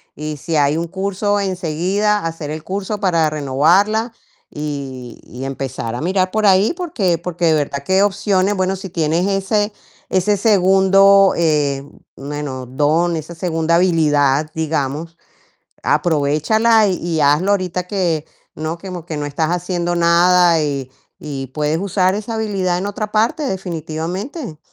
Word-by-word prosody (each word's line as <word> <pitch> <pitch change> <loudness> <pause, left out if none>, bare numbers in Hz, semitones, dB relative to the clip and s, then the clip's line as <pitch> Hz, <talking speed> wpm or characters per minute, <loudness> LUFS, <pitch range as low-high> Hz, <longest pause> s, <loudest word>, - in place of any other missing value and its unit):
Y 150 0 -5
si 165 +2 -4
hay 145 +1 +2
un 170 0 -2
curso 200 +2 -1
enseguida, 190 +3 0
hacer 165 -2 -4
el 155 0 -6
curso 200 +3 -4
para 170 -5 +2
renovarla, 170 - +2 0.4
y 135 -5 -6
y 130 +2 -8
empezar 130 -4 -4
a - - -4
mirar, 185 +2 0
por 215 -1 0
ahí. 195 - +4
Porque 220 - -1
porque 175 0 -3
de 160 - +4
verdad, 140 -1 -2
que 190 +5 +3
opciones 200 0 +1
Bueno, 185 0 0
si 190 0 -8
tienes 165 +3 0
ese 205 +2 0 0.4
ese 195 +2 +1
segundo, 195 -1 +5
eh, 145 -4 +1 0.3
bueno, 140 -2 -5
don, 155 +6 +1
esa 160 +2 -7
segunda 165 -1 0
habilidad, 155 -5 +2
digamos, 160 +1 -2 0.7
aprovéchala, 180 +9 +2
y 175 -4 -2
hazlo 150 +8 +3
ahorita 180 -2 -1
que 175 -6 -1 0.3
no 155 +2 -3
que 190 +2 -8 0.2
que 160 - -5
no 145 - -3
estás 155 +3 -1
haciendo 175 0 -1
nada. 170 0 +4
Y 140 -3 -3 0.3
y 135 -3 -5
puedes 150 +1 0
usar 190 0 +1
esa 215 +2 -5
habilidad 195 -5 -1
en 190 - -3
otra 210 +1 -5
parte, 225 +8 +1
definitivamente. 180 - -5
175 Hz, 145 wpm, -18 LUFS, 150-195 Hz, 0.7 s, segundo